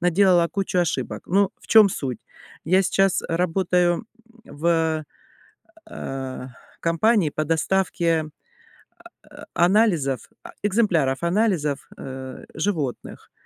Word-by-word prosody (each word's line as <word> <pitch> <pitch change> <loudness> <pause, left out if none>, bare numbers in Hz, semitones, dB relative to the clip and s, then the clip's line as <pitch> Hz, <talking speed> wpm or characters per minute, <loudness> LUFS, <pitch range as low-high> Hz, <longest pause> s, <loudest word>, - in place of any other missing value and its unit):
наделала 180 0 +4
кучу 195 -2 -2
ошибок. 175 - -1
Ну, 195 +2 +2
в - - -18
чем 220 -2 +7
суть? 130 - -4 0.5
Я 185 +4 +3
сейчас 195 0 +2
работаю 180 +1 +1 0.4
в, 160 -2 0 0.9
э-э, 130 -1 -6 0.3
компании 165 0 +2
по 155 - -2
доставке 165 0 +1 1.0
а - - -12
а 170 - +3
анализов, 175 - +1
а - - -10
экземпляров 175 - +1
анализов, 170 -6 0
э, 130 -1 -8
животных. 155 -7 -3
170 Hz, 105 wpm, -23 LUFS, 155-195 Hz, 1.0 s, чем